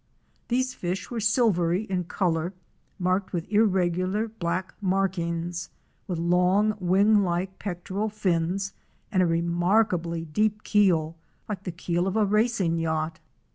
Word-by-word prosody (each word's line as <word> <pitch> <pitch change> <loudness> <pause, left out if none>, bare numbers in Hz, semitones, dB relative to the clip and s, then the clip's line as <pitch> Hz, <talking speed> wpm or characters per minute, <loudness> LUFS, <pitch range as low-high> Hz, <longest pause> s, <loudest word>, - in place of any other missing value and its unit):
These 255 +1 0
fish 180 +2 -4
were 235 - -2
silvery 205 -5 +2
in 185 -4 -2
color, 175 0 -1 0.4
marked 185 +2 0
with 170 -1 -2
irregular 190 0 +2
black 185 -4 -3
markings, 175 -3 -1 0.4
with 180 -4 -2
long, 180 +5 +3
wing 200 +4 +4
like 185 +1 -2
pectoral 195 +2 -3
fins 195 -1 -1 0.4
and 185 - +3
a 180 - +3
remarkably 170 0 +1
deep 210 +6 0
keel, 165 -6 +2 0.3
like 200 -2 -5
the 180 - -2
keel 175 +1 -1
of 195 - -2
a 215 - +4
racing 210 -5 +1
yacht. 160 0 -1
185 Hz, 130 wpm, -26 LUFS, 170-205 Hz, 0.4 s, wing